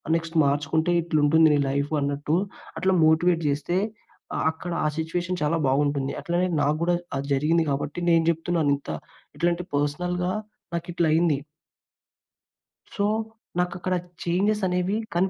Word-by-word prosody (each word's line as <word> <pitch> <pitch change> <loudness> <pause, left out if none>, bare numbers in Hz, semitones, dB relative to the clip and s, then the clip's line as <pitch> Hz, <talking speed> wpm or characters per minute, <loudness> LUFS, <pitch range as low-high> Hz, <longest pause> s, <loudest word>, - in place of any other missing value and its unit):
Next 165 0 -3
మార్చుకుంటే, 145 +4 +1
ఇట్లుంది 155 -1 +2
నీ - - +3
లైఫ్" 140 +2 -1
అన్నట్టు 145 +2 0 0.4
అట్లా 190 0 +2
మోటివేట్ 165 +2 +3
చేస్తే, 150 +5 -1 0.7
అక్కడ 170 +2 -7
ఆ - - +4
సిట్యుయేషన్ 175 +3 -2
చాలా 155 +3 +1
బావుంటుంది. 140 0 +1
అట్లనే 175 +2 0
నాగూడా 155 +4 +1 0.2
అది 140 +1 -4
జరిగింది 160 +4 +2
కాబట్టి 145 +4 -2
నేను 165 -1 +4
చెప్తున్నాను 165 -2 0
ఇంత 140 - -12 0.5
ఇట్లాంటి 175 +1 0
పర్సనల్‌గా 180 +5 0 0.4
నాకు 170 0 -3
ఇట్ల 170 0 +1
అయింది. 160 -3 +3 1.6
సో, 200 - +1 0.5
నాకు 180 0 +1
అక్కడ 185 +1 -1 0.3
చేంజెస్ 200 +5 +1
అనేవి 180 +3 0 0.2
కన్ 180 +3 +2
165 Hz, 130 wpm, -25 LUFS, 145-175 Hz, 1.6 s, ఆ